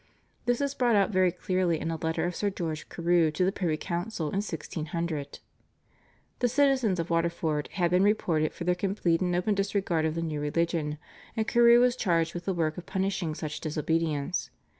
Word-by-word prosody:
This 245 +2 +2
is 280 -1 0
brought 245 -4 +2
out 200 +1 +3
very 185 -2 +3
clearly 180 -2 0
in 165 - -2
a - - -2
letter 160 +1 -1
of 175 0 -2
Sir 205 - 0
George 165 -5 -4
Carew 170 -1 +2
to 155 +4 0
the 190 - +2
privy 170 -6 -1
council 170 -1 -3
in 195 - -3
1600. 165 -5 -4 1.0
The 245 - +3
citizens 260 -7 +2
of 165 +1 -3
Waterford 165 -3 0
had 175 -2 +1
been 180 +1 +4
reported 175 -7 +2
for - - -7
their 180 +1 +2
complete 180 -2 0
and 180 -1 +1
open 180 +4 +1
disregard 195 -5 0
of 160 0 -1
the 165 - -2
new 155 -2 -3
religion, 150 0 -1 0.4
and 220 -1 0
Carew 235 0 +6
was 250 -1 +3
charged 170 -7 +1
with 175 0 -6
the 195 - 0
work 160 -1 -1
of 175 - -12
punishing 190 -4 -1
such 150 -1 -5
disobedience. 155 +1 -1
175 Hz, 190 wpm, -28 LUFS, 160-195 Hz, 1.0 s, Carew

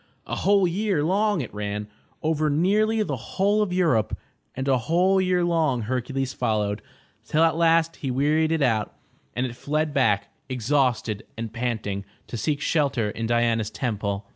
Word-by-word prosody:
A - - -3
whole 200 -2 +3
year 190 -3 0
long 200 +2 +2
it 125 - -7
ran, 105 0 -4 0.4
over 155 -1 +1
nearly 210 +8 +2
the 145 -9 -2 0.2
whole 205 +2 +3
of 205 -3 0
Europe, 160 - +1 0.4
and 130 +1 -3
a 130 -2 +3
whole 180 +8 +2
year 180 -1 +2
long 155 -8 +1
Hercules 130 +3 -2
followed, 105 -1 -1 0.4
till 155 +2 +2
at 165 -2 +3
last 165 0 +3
he 135 - -4
wearied 150 +5 +2
it 160 -3 +1
out, 110 -5 0 0.4
and 125 - 0
it 120 -2 -5
fled 155 +3 -1
back, 105 -7 +1 0.2
exhausted 125 -4 0
and 115 -1 -5
panting, 110 -5 -2 0.2
to - - -7
seek 145 +5 -1
shelter 140 -9 +1
in 115 +1 -3
Diana's 115 -2 +1
Temple. 105 -5 -3
140 Hz, 165 wpm, -25 LUFS, 115-165 Hz, 0.4 s, whole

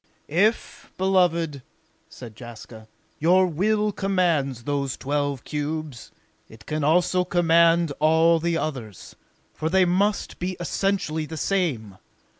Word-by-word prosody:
"If, 205 +8 0
beloved," 170 -6 +1 0.5
said 120 -8 -11
Jaska, 110 -1 -11 0.3
"your 180 +4 +4
will 210 +5 0
commands 170 - 0
those 140 -1 -2
twelve 145 -1 -2
cubes, 150 -3 -5 0.4
it 110 - -15
can 155 -1 -3
also 180 +4 +2
command 170 -2 +3
all 160 +2 +4
the 170 0 -1
others, 125 - -6 0.4
for 160 - -3
they 190 +1 +4
must 195 +3 0
be 180 +1 -3
essentially 175 -3 -1
the 160 - -7
same. 135 - -2
160 Hz, 115 wpm, -24 LUFS, 145-180 Hz, 0.5 s, your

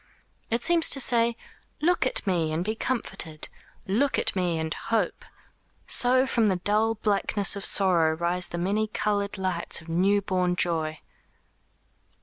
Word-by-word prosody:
It 235 +1 -1
seems 340 -1 +4
to 275 - +3
say: 235 -2 +1 0.4
"Look 340 -4 +1
at - - 0
me 170 -5 0
and 165 +3 -2
be 215 - -1
comforted! 195 -10 -4 0.4
Look 255 +9 0
at - - 0
me 180 -3 0
and 160 0 -2
hope! 220 -5 -2 0.6
So 255 +1 +4
from 230 -4 +1
the 190 - +1
dull 210 +5 +1
blackness 205 -1 +1
of 200 - -6
sorrow 170 -5 +3
rise 175 +1 0
the 175 - -6
many 200 +5 -1
coloured 205 -1 -2
lights 185 -3 -1
of 165 0 -15
new 190 +5 +2
born 180 -2 0
joy." 160 -3 -1
195 Hz, 150 wpm, -26 LUFS, 175-225 Hz, 0.6 s, seems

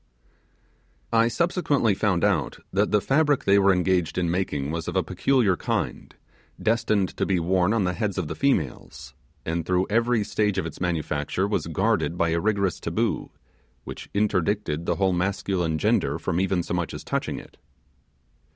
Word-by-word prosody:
I 115 0 +5
subsequently 145 - +1
found 95 -3 0
out 100 -6 +1 0.2
that 100 +2 +2
the 105 -1 +2
fabric 145 +2 +2
they 100 +1 +4
were 100 0 +5
engaged 90 -2 +1
in 85 -2 +1
making 75 -6 -1
was 85 0 -4
of - - -4
a - - +2
peculiar 125 -9 +2
kind, - - -3 0.4
destined 110 -4 +1
to - - 0
be 95 -2 +1
worn 90 +3 +2
on 115 -3 +2
the 90 0 0
heads 105 -1 -2
of 90 -5 -1
the - - -4
females, 140 -1 -2 0.3
and 85 +1 -1
through 90 +2 +1
every 115 0 +2
stage 105 -1 0
of 95 - 0
its 85 - -8
manufacture 85 +1 -1
was 105 - -1
guarded 85 - 0
by 85 -2 +2
a 85 0 +1
rigorous 100 -1 0
taboo, - - -1 0.5
which - - -9
interdicted 100 -5 0
the - - +1
whole 95 -1 +1
masculine 90 -2 -1
gender 75 -1 +1
from 85 +1 -2
even 95 -2 +1
so - - -4
much 85 -1 -2
as - - -7
touching - - -2
it. - - -12
95 Hz, 170 wpm, -25 LUFS, 85-105 Hz, 0.5 s, I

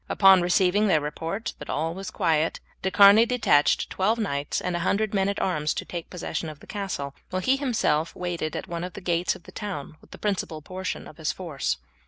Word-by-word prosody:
Upon 195 -2 +6
receiving 185 +4 +3
their 175 -6 +4
report 165 +8 -4
that - - -9
all 160 +2 -1
was 195 +2 -6
quiet 165 -3 +1 0.2
De 190 - 0
Charny 200 +3 +8
detached 225 -12 +3
twelve 210 +5 +1
knights 145 -10 -1
and 180 -1 -2
a - - -1
hundred 200 +5 0
men 195 -1 +2
at 200 - -2
arms 150 -5 0
to - - -3
take 170 -2 -6
possession 175 -2 -4
of 150 -2 -10
the - - -15
castle, 190 -9 -4 0.2
while 185 - -1
he 260 - +4
himself 220 - 0
waited 175 -3 -3
at - - -4
one 170 -1 -4
of 180 -1 -5
the - - -7
gates 175 -1 0
of - - -14
the - - -13
town 180 -7 -6
with - - -20
the - - -11
principal 190 -6 -2
portion 185 +3 -5
of 155 - -13
his 160 -2 -1
force. 155 - -3
180 Hz, 220 wpm, -26 LUFS, 160-200 Hz, 0.2 s, Charny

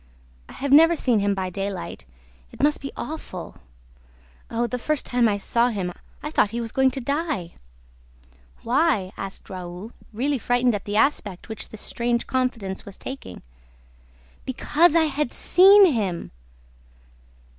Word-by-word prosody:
I - - -11
have 280 0 -3
never 325 +3 +7
seen 245 -8 +2
him 200 0 +1
by 185 -1 -3
daylight... 195 - -5 0.5
it - - -6
must 295 +1 +2
be 275 - -5
awful!... 240 - -7 0.9
Oh, 235 +1 0
the 250 +1 -3
first 305 +3 -1
time 245 -2 +2
I 205 - 0
saw 235 +4 +1
him!... 190 -6 -3 0.3
I 300 - -4
thought - - +4
that - - -9
he - - -1
was 230 -1 -4
going 265 0 +3
to 270 - -5
die." 280 - -2 1.1
"Why?" 235 - +1
asked 195 0 -7
Raoul, 185 +3 -8 0.2
really 265 +5 -1
frightened 245 +1 +2
at 205 - -4
the 205 +1 -2
aspect 215 -7 0
which 220 - -7
this 220 - -7
strange 235 0 -1
confidence 235 -7 -2
was 200 - -11
taking. 265 - -8 1.0
"BECAUSE 305 +5 +2
I 330 - +5
HAD 300 -3 -1
SEEN 390 +3 +7
HIM!" 195 -7 -2
235 Hz, 155 wpm, -24 LUFS, 200-280 Hz, 1.1 s, never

